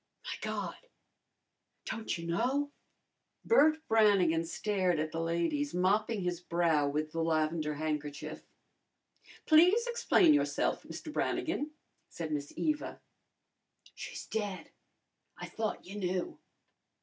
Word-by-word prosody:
"My - - -4
God! - - -3 1.1
don't 220 -6 -3
you 170 - -7
know?" 260 +12 0 0.7
Bert 315 -7 +4
Brannigan 200 -7 +4
stared 185 -1 0
at 155 0 -2
the 165 +1 -2
ladies, 170 - -1
mopping 205 +4 +2
his 175 -1 -2
brow 170 -4 +2
with 155 +2 -2
the 165 - -2
lavender 155 -1 0
handkerchief. 150 -1 -4 1.0
"Please 360 +9 +6
explain 470 -8 +4
yourself, 295 - +1
Mr. - - -8
Brannigan," 295 - -1 0.4
said 160 -2 -5
Miss 145 -1 -3
Eva. 305 -1 -1 0.9
"She's - - -7
dead. 205 -4 -4 0.7
I - - -6
thought 220 -1 -4
you 195 +3 -8
knew." 180 -1 -2
180 Hz, 115 wpm, -32 LUFS, 160-235 Hz, 1.1 s, Please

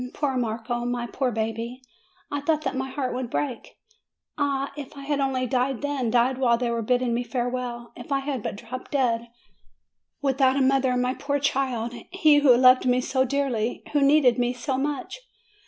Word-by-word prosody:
Poor 280 -3 -1
Marco, 240 0 -2
my 245 0 -2
poor 255 +1 -1
baby! 225 +2 -3 0.5
I 285 - -1
thought 310 +1 0
that 270 -2 -2
my 265 0 -2
heart 265 -1 -3
would 250 -1 -3
break! 255 -1 -4 0.6
Ah, 280 -2 -1
if 290 -1 -9
I - - -7
had 285 0 -1
only 265 -2 0
died 255 +1 -1
then, 280 -5 -1
died 245 +2 +2
while 240 -3 +3
they 240 -1 -1
were 235 0 -1
bid 245 +3 +1
ding 245 -2 0
me 240 +1 0
farewell! 245 -1 -4
If 245 - -11
I 275 - +3
had 270 -3 -3
but - - -4
dropped 240 +4 -8
dead! 235 -4 0 0.9
With 275 -1 -1
out 265 0 +4
a - - +2
mother, 260 -1 +2
my 250 +1 +1
poor 285 +1 -2
child, 260 -4 -1 0.2
he 315 -5 +4
who 265 -4 +6
loved 255 0 +6
me 250 0 +3
so 260 +1 +1
dearly, 255 -4 -1
who 290 - +3
needed 275 -4 +4
me 245 0 +1
so 260 +2 -3
much! 285 - -3
255 Hz, 195 wpm, -25 LUFS, 240-275 Hz, 0.9 s, who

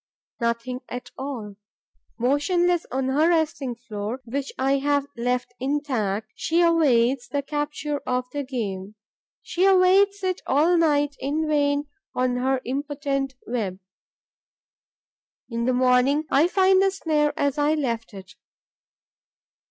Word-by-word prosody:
Nothing 235 +2 -2
at 250 0 -7
all. 235 -7 -6 0.6
Motionless 335 +8 +1
on 260 +1 -1
her 300 +5 +3
resting 310 -7 0
floor, 225 0 -5
which 275 +4 -3
I 270 +1 +2
have 285 0 +1
left 245 +1 -1
intact, 245 -7 -1
she 335 +2 +1
awaits 265 -7 +3
the 285 +1 -2
capture 295 0 -3
of 250 0 0
the 290 - -2
game; 210 -6 -4 0.5
she 355 - -1
awaits 390 +1 +4
it 370 -1 -1
all 310 +6 +3
night 290 -3 +2
in 300 +4 -1
vain 290 -1 +1 0.3
on 250 0 +1
her 260 +1 0
impotent 275 0 -2
web. 215 -6 -3 1.7
In 230 0 -1
the 255 - +2
morning, 255 +4 +3
I 295 +5 +5
find 380 +1 +4
the 390 - +4
snare 310 -6 0
as 285 +1 0
I 295 +2 +3
left 235 -6 -2
it. 190 -1 -11
275 Hz, 130 wpm, -24 LUFS, 245-305 Hz, 1.7 s, I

